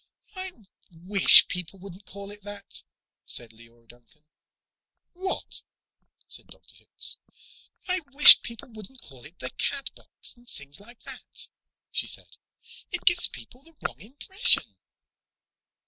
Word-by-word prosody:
"I 375 0 -8 0.4
wish 185 +3 +7
people 180 +1 -6
wouldn't 195 +1 -14
call 200 +1 -9
it 205 0 -13
that," 205 0 -11 0.4
said 120 -2 -6
Leora 115 +1 -22
Duncan. 120 +6 -23 0.9
"What?" 375 +1 -6 0.6
said - - -6
Dr. - - -17
Hitz. - - -2 0.7
"I 365 0 -2
wish 290 +2 +11
people 235 +1 -10
wouldn't 220 +3 -9
call 130 -3 -15
it 165 +3 -17
'the 130 - -9
Catbox,' 275 -1 -8
and 240 0 -22
things 140 +1 -14
like 230 +3 -19
that," - - -10 0.4
she - - -4
said. - - -8 0.5
"It 360 - -7
gives 350 -1 +1
people 250 - -13
the 330 +3 -23
wrong - - -7
impression." 335 - 0
205 Hz, 130 wpm, -24 LUFS, -, 0.9 s, wish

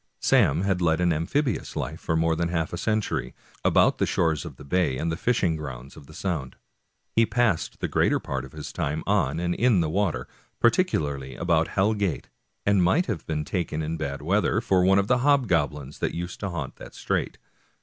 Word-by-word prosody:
Sam 75 +5 +3
had 95 -2 0
led 80 -1 +2
an 90 -1 +3
amphibious 120 - -1
life - - -4
for 80 - -1
more 80 0 +2
than 85 +1 -1
half 80 -1 -2
a - - -2
century, 105 - -1 0.3
about - - +4
the - - +2
shores 80 -3 +1
of - - -8
the - - -12
bay 85 -3 +1
and 80 +5 -1
the - - -1
fishing 95 -4 +1
grounds 70 -3 -7
of 70 - -13
the 75 - -13
Sound. 80 -9 -3 0.6
He 115 - +5
passed 120 -9 0
the - - 0
greater - - +2
part 65 -2 -4
of 65 - -10
his 75 -1 -7
time 75 +3 -2
on - - +1
and 85 0 0
in 120 -1 +3
the 80 -2 0
water, 95 -1 0 0.3
particularly 75 - +1
about - - +1
Hell 100 +3 +1
Gate, 100 -7 -2 0.4
and 100 -2 +4
might 145 - +3
have 105 -10 -4
been 75 -1 -2
taken, 80 -3 -2
in 80 +2 -2
bad 70 -3 -4
weather, 100 +4 +2
for 95 -5 +2
one 95 +1 +5
of 100 - +3
the 125 +4 +2
hobgoblins 85 - +1
that - - -1
used 85 +1 -5
to 100 - -3
haunt 75 -7 -5
that - - -11
strait. - - -2
85 Hz, 205 wpm, -25 LUFS, 75-100 Hz, 0.6 s, He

